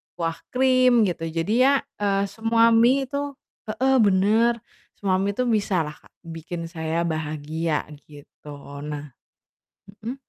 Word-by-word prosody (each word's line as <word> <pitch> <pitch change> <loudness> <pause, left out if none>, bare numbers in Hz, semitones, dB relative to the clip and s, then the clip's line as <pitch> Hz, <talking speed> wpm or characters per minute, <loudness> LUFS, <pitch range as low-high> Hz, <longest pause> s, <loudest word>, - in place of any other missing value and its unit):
kuah 165 -1 -2
krim, 255 -2 +4
gitu, 165 -2 -3
jadi 165 +6 -2
ya, 275 +2 +5 0.3
eee, 200 -1 +1
semua 230 +1 +3
mie 245 +4 +4
itu 280 +1 -4 0.3
heeh, 265 +5 +1
bener, 215 +4 +4 0.4
semua 190 -2 0
mie 200 +1 0
itu 250 - 0
bisalah 185 -9 0 0.3
bikin 165 0 -7
saya 160 0 -2
bahagia 155 0 -2 0.2
gitu. 145 0 -14 0.4
Nah 145 -1 -7 0.9
mhm, 245 +4 -4
195 Hz, 120 wpm, -24 LUFS, 165-235 Hz, 0.9 s, ya